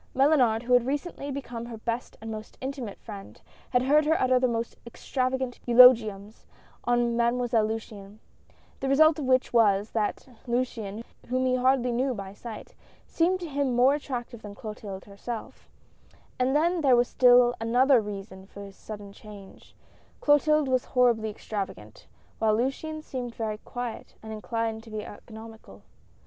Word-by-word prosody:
Mellunard, 255 Hz, -5 st, +3 dB
who 250 Hz, +1 st, 0 dB
had 245 Hz, 0 st, +4 dB
recently 285 Hz, +1 st, -3 dB
become 245 Hz, -4 st, -6 dB
her 235 Hz, -2 st, -7 dB
best 230 Hz, +2 st, -4 dB
and 225 Hz, 0 st, -7 dB
most 215 Hz, 0 st, -8 dB
intimate 260 Hz, -6 st, -6 dB
friend, 200 Hz, -3 st, -10 dB, 0.3 s
had 250 Hz, 0 st, +2 dB
heard 295 Hz, +4 st, +4 dB
her 320 Hz, +1 st, +3 dB
utter 255 Hz, 0 st, +3 dB
the 255 Hz, -, +2 dB
most 230 Hz, -1 st, -3 dB
extravagant 255 Hz, +1 st, -3 dB
eulogiums 225 Hz, -4 st, +5 dB, 0.4 s
on 240 Hz, -1 st, +1 dB
Mademoiselle 235 Hz, -1 st, +1 dB
Luciane; 215 Hz, -2 st, -7 dB, 0.6 s
the 270 Hz, -, -2 dB
result 310 Hz, +3 st, +5 dB
of 290 Hz, -, -3 dB
which 255 Hz, -1 st, +2 dB
was, 210 Hz, -3 st, +3 dB
that 215 Hz, +3 st, -2 dB, 0.2 s
Luciane, 230 Hz, -3 st, -2 dB, 0.2 s
whom 255 Hz, +1 st, 0 dB
he 255 Hz, -, +2 dB
hardly 255 Hz, 0 st, +2 dB
knew 255 Hz, +2 st, 0 dB
by 195 Hz, -2 st, -7 dB
sight, 220 Hz, +1 st, -9 dB, 0.3 s
seemed 360 Hz, +3 st, +1 dB
to 345 Hz, -, -4 dB
him 280 Hz, -4 st, -1 dB
more 255 Hz, +3 st, +5 dB
attractive 245 Hz, -5 st, -5 dB
than 205 Hz, -1 st, -9 dB
Clotilde 210 Hz, -3 st, -8 dB
herself; 215 Hz, +3 st, -8 dB, 0.7 s
and 255 Hz, +2 st, +1 dB
then 340 Hz, +3 st, +2 dB
there 265 Hz, -4 st, +5 dB
was 240 Hz, 0 st, +3 dB
still 245 Hz, -1 st, +5 dB
another 245 Hz, +2 st, +4 dB
reason 195 Hz, -2 st, -8 dB
for 200 Hz, -, -13 dB
this 200 Hz, -1 st, -10 dB
sudden 205 Hz, -2 st, -9 dB
change 200 Hz, -2 st, -14 dB, 0.2 s
— -, -, -33 dB
Clotilde 300 Hz, 0 st, +3 dB
was 255 Hz, -1 st, +1 dB
horribly 235 Hz, -3 st, +2 dB
extravagant, 195 Hz, -, -7 dB, 0.3 s
while 215 Hz, -1 st, +2 dB
Luciane 310 Hz, +5 st, -3 dB
seemed 245 Hz, -5 st, -6 dB
very 215 Hz, -2 st, -3 dB
quiet 245 Hz, -1 st, -7 dB
and 220 Hz, 0 st, -7 dB
inclined 225 Hz, 0 st, -3 dB
to 225 Hz, -, -15 dB
be 215 Hz, -1 st, -5 dB
economical. 220 Hz, +1 st, -12 dB
240 Hz, 160 wpm, -27 LUFS, 220-260 Hz, 0.7 s, eulogiums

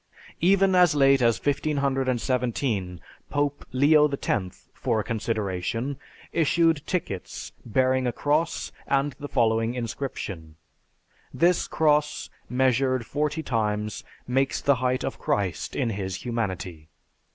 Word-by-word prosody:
Even 195 Hz, +2 st, +4 dB
as 180 Hz, -4 st, +5 dB
late 135 Hz, -1 st, +5 dB
as 115 Hz, -3 st, +3 dB
1517, 130 Hz, -, 0 dB, 0.3 s
Pope 145 Hz, 0 st, -1 dB
Leo 150 Hz, +3 st, +5 dB
X, 100 Hz, -9 st, -3 dB
for 110 Hz, -, -1 dB
a -, -, -1 dB
consideration, 110 Hz, +3 st, -2 dB, 0.4 s
issued 165 Hz, -1 st, +2 dB
tickets 100 Hz, -, -4 dB
bearing 130 Hz, +2 st, +1 dB
a -, -, +1 dB
cross 150 Hz, +6 st, 0 dB, 0.2 s
and 140 Hz, +1 st, +1 dB
the 145 Hz, -, -5 dB
following 115 Hz, -1 st, +1 dB
inscription, 105 Hz, -, -5 dB, 0.8 s
"This 175 Hz, +1 st, +2 dB
cross 150 Hz, -1 st, +1 dB, 0.2 s
measured 130 Hz, -1 st, +2 dB
forty 150 Hz, +3 st, -1 dB
times 105 Hz, -4 st, -1 dB, 0.2 s
makes 135 Hz, +2 st, +1 dB
the 140 Hz, -2 st, +3 dB
height 130 Hz, 0 st, +1 dB
of -, -, -4 dB
Christ 95 Hz, -6 st, -1 dB
in 115 Hz, -, 0 dB
His 95 Hz, -3 st, -3 dB
humanity. 95 Hz, -9 st, -3 dB
130 Hz, 115 wpm, -26 LUFS, 110-145 Hz, 0.8 s, as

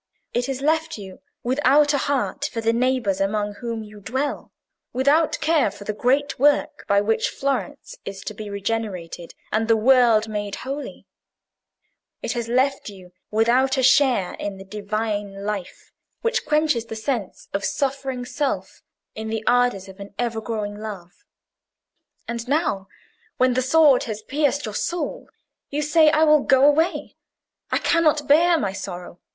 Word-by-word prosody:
It 245 Hz, +1 st, 0 dB
has 270 Hz, -1 st, -3 dB
left 320 Hz, +1 st, 0 dB
you 190 Hz, -3 st, -10 dB, 0.2 s
without 290 Hz, +3 st, +3 dB
a 285 Hz, -, +2 dB
heart 285 Hz, +1 st, -1 dB
for 230 Hz, -, -4 dB
the 225 Hz, 0 st, +1 dB
neighbours 240 Hz, -5 st, +1 dB
among 205 Hz, +1 st, 0 dB
whom 230 Hz, -2 st, -4 dB
you 210 Hz, 0 st, -12 dB
dwell, 260 Hz, +8 st, -3 dB, 0.4 s
without 285 Hz, +5 st, +2 dB
care 315 Hz, -1 st, +3 dB
for -, -, -11 dB
the 210 Hz, -, -3 dB
great 265 Hz, +6 st, 0 dB
work 290 Hz, +2 st, +2 dB
by 200 Hz, 0 st, +4 dB
which 220 Hz, +2 st, +1 dB
Florence 275 Hz, -, -3 dB
is 195 Hz, -1 st, -7 dB
to -, -, -6 dB
be 210 Hz, 0 st, -7 dB
regenerated 200 Hz, -5 st, -4 dB, 0.2 s
and 220 Hz, +1 st, +1 dB
the 225 Hz, -1 st, +4 dB
world 235 Hz, -2 st, +4 dB
made 205 Hz, -2 st, -4 dB
holy; 275 Hz, +2 st, -6 dB, 1.2 s
it -, -, -1 dB
has 235 Hz, -2 st, -3 dB
left 255 Hz, +1 st, +1 dB
you 185 Hz, -3 st, -13 dB, 0.2 s
without 245 Hz, +5 st, +2 dB
a 260 Hz, -, +1 dB
share 255 Hz, -7 st, +4 dB
in 200 Hz, -1 st, -4 dB
the 190 Hz, -, -9 dB
Divine 205 Hz, 0 st, -4 dB
life 205 Hz, -4 st, -5 dB, 0.3 s
which 465 Hz, +1 st, 0 dB
quenches 300 Hz, -6 st, +2 dB
the 225 Hz, -, -6 dB
sense 220 Hz, -3 st, -4 dB
of 195 Hz, 0 st, -1 dB
suffering 270 Hz, +1 st, -2 dB
Self 285 Hz, +2 st, -3 dB, 0.3 s
in 220 Hz, 0 st, -6 dB
the 220 Hz, 0 st, -3 dB
ardours 245 Hz, -6 st, +2 dB
of 190 Hz, +1 st, -13 dB
an 200 Hz, 0 st, -10 dB
ever 230 Hz, -2 st, -2 dB
growing 210 Hz, -2 st, -4 dB
love. 200 Hz, -, -9 dB, 1.0 s
And 235 Hz, 0 st, -4 dB
now, 280 Hz, -, 0 dB, 0.5 s
when 255 Hz, 0 st, +3 dB
the 255 Hz, -, +1 dB
sword 280 Hz, 0 st, +4 dB
has 215 Hz, -2 st, -5 dB
pierced 285 Hz, +1 st, 0 dB
your 215 Hz, -, -5 dB
soul, 340 Hz, +6 st, -3 dB, 0.4 s
you 295 Hz, +1 st, -2 dB
say, 310 Hz, +1 st, +5 dB
'I 310 Hz, +1 st, +3 dB
will 305 Hz, -2 st, +5 dB
go 270 Hz, 0 st, +4 dB
away; 310 Hz, +4 st, +2 dB, 0.5 s
I -, -, +3 dB
cannot 305 Hz, -4 st, +2 dB
bear 335 Hz, +4 st, +5 dB
my 200 Hz, -10 st, -2 dB
sorrow. 180 Hz, -2 st, -7 dB
240 Hz, 160 wpm, -23 LUFS, 210-285 Hz, 1.2 s, say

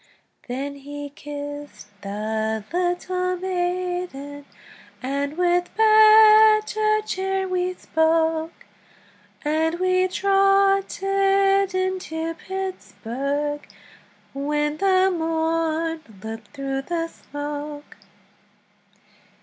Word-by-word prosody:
Then 275 Hz, +3 st, -4 dB
he 290 Hz, +1 st, -8 dB
kissed 290 Hz, -4 st, -8 dB
the 220 Hz, +2 st, -2 dB
little 365 Hz, +1 st, -1 dB
maiden, 355 Hz, -6 st, -3 dB, 0.6 s
And 280 Hz, +3 st, -2 dB
with 355 Hz, 0 st, +2 dB
better 430 Hz, 0 st, +6 dB
cheer 385 Hz, -1 st, -2 dB
we 365 Hz, 0 st, -1 dB
spoke, 320 Hz, 0 st, 0 dB, 0.8 s
And 320 Hz, +3 st, 0 dB
we 370 Hz, 0 st, +2 dB
trotted 390 Hz, 0 st, +2 dB
into 365 Hz, -3 st, -2 dB
Pittsburg, 295 Hz, -6 st, -4 dB, 0.7 s
When 295 Hz, +2 st, -1 dB
the 380 Hz, 0 st, +3 dB
morn 325 Hz, 0 st, -1 dB, 0.2 s
looked 220 Hz, 0 st, -7 dB
through 275 Hz, -1 st, -4 dB
the 330 Hz, +3 st, -2 dB
smoke. 290 Hz, -1 st, -7 dB
330 Hz, 75 wpm, -23 LUFS, 290-380 Hz, 0.8 s, better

